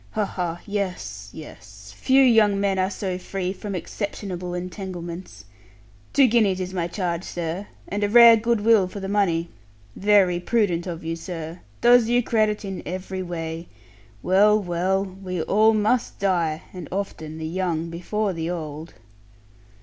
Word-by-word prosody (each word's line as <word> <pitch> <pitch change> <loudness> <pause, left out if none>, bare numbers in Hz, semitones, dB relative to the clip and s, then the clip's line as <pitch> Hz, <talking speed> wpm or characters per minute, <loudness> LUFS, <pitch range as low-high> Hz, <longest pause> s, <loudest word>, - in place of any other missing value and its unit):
Ha, 215 -2 +1
ha! 175 -3 -4
Yes, 145 - -4
yes! 105 -8 -12
Few 265 - +4
young 220 -5 +4
men 195 -1 +1
are 185 0 +1
so 190 -2 -4
free 185 0 -3
from 200 0 -6
exceptionable 180 -1 -5
entanglements. 175 - -7 0.7
Two 275 - +5
guineas 215 -6 +3
is 185 0 -4
my 170 -2 -1
charge, 175 -1 -2
sir: 175 +3 -4 0.2
and 205 +1 -2
a 205 - +1
rare 235 +1 +9
good 230 0 0
will 215 -3 +4
for 190 +2 -8
the 195 - -5
money. 175 -5 +1 0.5
Very 195 -3 +3
prudent 180 -3 0
of 170 -2 -5
you, 165 +1 -3
sir. 165 -1 -7 0.2
Does 240 -1 +6
you 245 +1 +3
credit 215 -2 +1
in 195 -1 -5
every 185 +2 -5
way. 165 -1 -5 0.6
Well, 210 +3 +5
well; 190 +1 0
we 185 -3 -5
all 220 +2 +4
must 220 +3 +1
die; 170 -5 0
and 180 -5 -7
often 160 -5 -4
the 160 - -5
young 170 -1 -2
before 195 +4 -2
the 165 0 -3
old.' 160 -2 -6
185 Hz, 155 wpm, -24 LUFS, 170-205 Hz, 0.7 s, rare